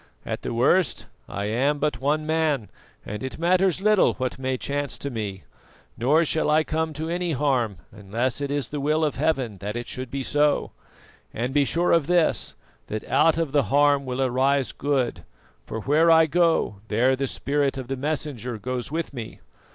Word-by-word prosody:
At - - -4
the - - -4
worst, 130 +6 +2 0.2
I 100 - -3
am 130 +8 +1
but 150 -1 -1
one 150 +3 +1
man, 155 -7 0 0.3
and 105 +4 -6
it 130 - -5
matters 185 +2 +2
little 215 -2 +4
what 130 -1 -3
may 130 0 -1
chance 145 +2 -3
to 140 - -5
me; 105 -5 -5 0.5
nor 145 +8 +3
shall 160 0 0
I 155 +1 +4
come 160 +1 -1
to 155 +2 -4
any 175 0 -1
harm 130 -7 +1 0.2
unless 115 +7 -3
it 140 - -2
is 145 -4 -2
the 145 - -4
will 155 +3 +1
of 150 - -2
Heaven 130 -9 0
that 105 +3 -5
it 120 0 -4
should 130 -1 -5
be 135 +2 -3
so; 145 +2 +1 0.6
and 125 +3 -2
be 145 -1 +3
sure 170 +5 +1
of 165 -4 +3
this, 175 -2 +1 0.3
that 110 0 -5
out 165 -1 +3
of 165 -4 -1
the 145 -3 +2
harm 145 0 +3
will 130 +1 -1
arise 130 +1 +1
good, 135 -4 -1 0.4
for 110 - -4
where 155 +7 +3
I 160 0 +7
go 165 - +2
there 125 +5 +2
the 135 +1 -2
spirit 140 +1 -1
of 130 -2 -5
the 135 - -2
Messenger 135 -4 -3
goes 125 +3 -4
with 165 -1 -3
me. 115 -4 -7
140 Hz, 190 wpm, -24 LUFS, 125-155 Hz, 0.6 s, I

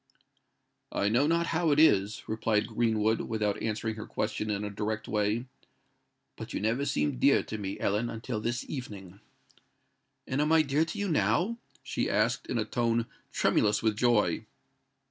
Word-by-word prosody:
"I 100 - +1
know 125 +7 +3
not 170 +1 +2
how 165 0 +2
it 145 0 +3
is," 105 -9 +4
replied 110 -1 +1
Greenwood, 110 -1 +1
without 105 -2 -1
answering 110 0 -2
her 105 +2 -7
question 105 0 -2
in 105 0 -1
a 105 - -4
direct 110 +1 -3
way, 105 +3 0 0.9
"but - - -7
you - - -1
never 115 +7 0
seemed 75 -4 0
dear - - +4
to 110 - -6
me, 100 -1 -4
Ellen, 105 +4 0
until 115 0 -4
this 120 +2 -2
evening." 100 -8 -7 1.1
"And 130 +2 -1
am 150 +1 +1
I 160 -1 +6
dear 145 +2 +1
to 155 - -6
you 205 - -1
now?" 170 - +1 0.2
she - - -2
asked, 110 +4 +1
in 125 - -2
a 110 - 0
tone 115 0 0 0.3
tremulous 105 +1 +2
with 110 -2 +2
joy. 120 -2 +2
110 Hz, 165 wpm, -29 LUFS, 105-125 Hz, 1.1 s, I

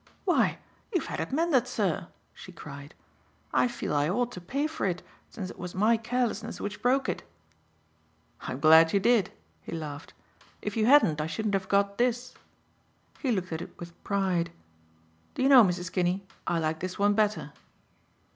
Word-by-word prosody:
"Why, 360 - +2 0.3
you've 360 -6 0
had - - -5
it - - -3
mended, 280 -4 +2
sir," 195 -8 -1 0.3
she - - -11
cried. 145 -3 -10 0.6
"I - - +4
feel 240 -10 -4
I 145 +1 +2
ought 245 +6 0
to 180 - -8
pay 275 - -2
for 310 -9 -2
it, 180 -1 -2 0.3
since 185 -4 -6
it - - -14
was 180 0 -6
my 215 +5 +4
carelessness 230 -1 -2
which 205 0 -5
broke 260 +2 +2
it." - - -2 1.2
"I'm 130 - -5
glad 160 +2 +7
you 200 - +4
did," 225 -2 +3 0.3
he - - -10
laughed. 155 -2 -7 0.4
"If 210 - -4
you 220 -1 +2
hadn't 210 - +5
I 150 - -2
shouldn't 205 +6 -2
have 190 -1 -1
got 200 +1 +1
this." 245 0 0 0.9
He 265 - 0
looked 185 -5 -1
at 160 0 -3
it - - -10
with 170 0 -11
pride. 190 -4 0 0.8
"Do - - -1
you 270 - +4
know, 260 -4 +9
Mrs. 180 -2 -1
Kinney, 180 +2 0 0.2
I 170 - +1
like 160 -1 -1
this 185 +1 -5
one 205 +1 +3
better." 210 -8 0
200 Hz, 175 wpm, -28 LUFS, 170-240 Hz, 1.2 s, know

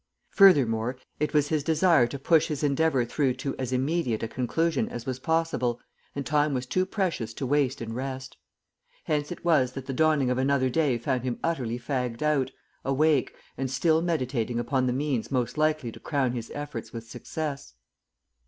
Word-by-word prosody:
Furthermore, 125 - +5 0.2
it 150 - 0
was 150 -1 +2
his 155 -3 0
desire 160 -4 +4
to 140 - -6
push 160 +3 +3
his 150 -2 -3
endeavour 140 -3 +2
through 130 +1 0
to 135 +2 -4
as 130 -1 -2
immediate 130 -3 0
a - - 0
conclusion 140 +6 0
as 120 0 -6
was 130 -1 -3
possible, 160 -6 0 0.4
and 140 -1 -3
time 150 +1 +2
was 125 0 -2
too 185 +8 0
precious 165 - -2
to 140 - -3
waste 135 -2 +1
in 115 0 -5
rest. 130 +1 -5 0.7
Hence 150 0 -1
it 175 - -8
was 135 -7 +3
that 135 -1 -6
the 135 - -4
dawning 150 -2 +3
of 125 - 0
another 130 -1 +2
day 145 -4 +2
found 125 +2 -1
him 125 -2 -2
utterly 125 -8 -1
fagged 125 -1 -3
out, 150 -4 +2 0.3
awake, 140 0 +2 0.2
and 135 -1 -1
still 160 +5 +2
meditating 130 -8 -1
upon 130 +2 0
the - - +2
means 130 -3 -1
most 125 -3 -1
likely 155 -5 +1
to - - -12
crown 140 -5 0
his 120 -2 -5
efforts 145 0 -6
with 115 -2 -8
success. 140 - -5
135 Hz, 180 wpm, -27 LUFS, 125-155 Hz, 0.7 s, Furthermore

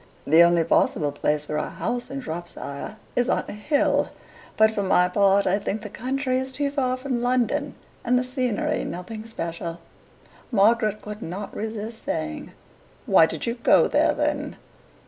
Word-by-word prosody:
The 160 +3 +6
only 170 -1 +5
possible 150 -2 +2
place 150 +1 -1
for 150 0 -3
a - - -2
house 245 0 -3
in 275 0 -5
Shropshire 175 - -6 0.2
is 245 0 +1
on - - +1
a - - -6
hill; 280 +8 +1 0.5
but, 220 0 +5
for 210 - -2
my 180 -2 +3
part, 200 +1 +3
I 190 +2 +2
think 210 +1 -3
the 210 - -7
country 260 +2 -1
is 260 0 -4
too 280 +1 -1
far 255 -3 0
from 255 -2 -2
London, 255 +3 0 0.3
and 250 +1 +2
the 250 - +1
scenery 255 +3 -1
nothing 215 +5 -6
special. 170 -5 -5 0.4
" - - -31 0.3
Margaret 215 0 +3
could 210 +1 -7
not 195 +3 -6
resist 220 +1 -5
saying, 75 -1 -4 0.5
"Why 160 - +6
did 160 -2 -4
you 235 - 0
go 235 - +4
there, - - +3
then?" - - -1
215 Hz, 170 wpm, -24 LUFS, 175-250 Hz, 0.5 s, The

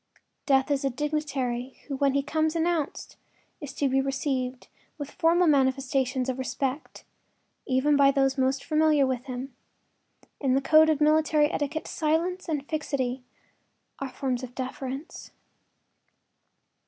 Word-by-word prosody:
Death 270 0 +3
is 280 -1 +1
a 275 - +2
dignitary 270 -3 -3
who 280 - -4
when 275 0 +1
he 280 - +2
comes 315 +2 0
announced 330 -2 -2 0.4
is 290 -3 -7
to 285 - +1
be 270 0 +2
received 265 -2 -2 0.3
with 290 -1 -6
formal 340 +2 +3
manifestations 265 -2 +1
of 260 0 -2
respect, 260 +2 -4 0.6
even 265 +3 +2
by 280 -1 +6
those 270 -1 +2
most 265 0 0
familiar 305 -2 +3
with 255 -1 -2
him. 255 0 -6 0.9
In 265 -2 +1
the - - +4
code 310 +3 +5
of 310 -1 +1
military 305 0 +3
etiquette 300 +2 -2
silence 335 +4 -1
and 295 -3 -2
fixity 270 -5 -2 0.8
are 275 - -4
forms 255 -1 -2
of 250 -1 -9
deference. 265 +3 -6
275 Hz, 135 wpm, -27 LUFS, 260-305 Hz, 0.9 s, by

